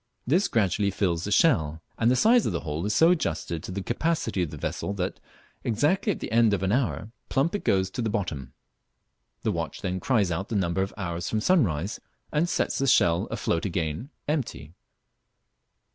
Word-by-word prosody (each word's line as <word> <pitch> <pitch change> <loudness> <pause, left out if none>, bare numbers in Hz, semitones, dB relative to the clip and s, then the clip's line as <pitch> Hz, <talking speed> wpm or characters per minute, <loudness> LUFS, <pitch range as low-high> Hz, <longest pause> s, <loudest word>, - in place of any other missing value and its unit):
This 175 +10 +3
gradually 100 -2 +1
fills 90 -4 -1
the 105 - -3
shell, 80 - +3 0.2
and 115 - +2
the 125 - +4
size 230 - +4
of - - 0
the 85 - -2
hole 75 0 -3
is 105 - 0
so 165 +2 +6
adjusted 85 - -1
to - - -7
the 95 +1 -4
capacity 120 - -1
of 85 - -1
the 75 - -8
vessel 100 - -3
that, 95 -2 -3 0.4
exactly 150 - +1
at - - -4
the - - -6
end 115 -2 +4
of 95 - -4
an 95 - +1
hour, 115 -2 -1 0.2
plump 140 +5 +1
it 205 - -2
goes 95 -1 +1
to 125 - -3
the 115 - 0
bottom. 80 -11 -3 0.9
The - - +1
watch - - -4
then 95 0 -1
cries 105 -3 +1
out 95 +5 -3
the 115 - -2
number 95 -1 +1
of 95 - -1
hours 85 -3 -3
from 110 - 0
sunrise 105 - +1 0.3
and 160 +3 +1
sets - - 0
the 135 - +1
shell 85 -9 +4
afloat 85 - -1
again 85 - -2 0.2
empty. 125 - -3
100 Hz, 195 wpm, -26 LUFS, 85-130 Hz, 0.9 s, so